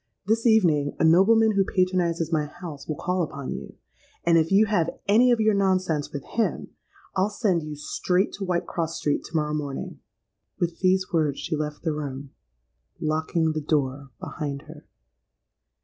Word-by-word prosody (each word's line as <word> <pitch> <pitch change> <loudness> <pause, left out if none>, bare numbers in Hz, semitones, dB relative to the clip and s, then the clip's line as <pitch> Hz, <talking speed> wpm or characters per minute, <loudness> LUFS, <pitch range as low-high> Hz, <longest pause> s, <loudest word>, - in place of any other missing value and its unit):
This 225 +3 +2
evening 165 -10 +3
a - - 0
nobleman 210 +7 +5
who 200 -2 +3
patronizes 180 -3 0
my 155 -2 +1
house, 155 -3 -9
will 155 - -2
call 180 +4 -1
upon 145 -4 -4
you; - - -7 0.5
and 170 0 +4
if 165 +1 +3
you 205 +3 +6
have 190 -6 +1 0.2
any 230 +5 +5
of 240 - +3
your 215 -1 +3
nonsense 185 -6 +1
with 140 -2 -5
him, 230 -1 -1 0.5
I'll 190 +2 +2
send 205 -5 0
you 150 -1 -6
straight 180 +6 0
to - - -3
Whitecross 170 -2 -2
Street 145 - -1
to - - -10
morrow 150 -1 0
morning.'—With 150 +3 -6
these 185 -1 +1
words 150 -4 +1
she 165 - -3
left 150 0 -4
the 160 -3 0
room, 140 -2 -6 0.7
locking 160 +1 0
the 155 0 -3
door 140 -2 -1
behind 145 -2 -5
her. 155 0 -13
165 Hz, 165 wpm, -25 LUFS, 150-190 Hz, 0.7 s, you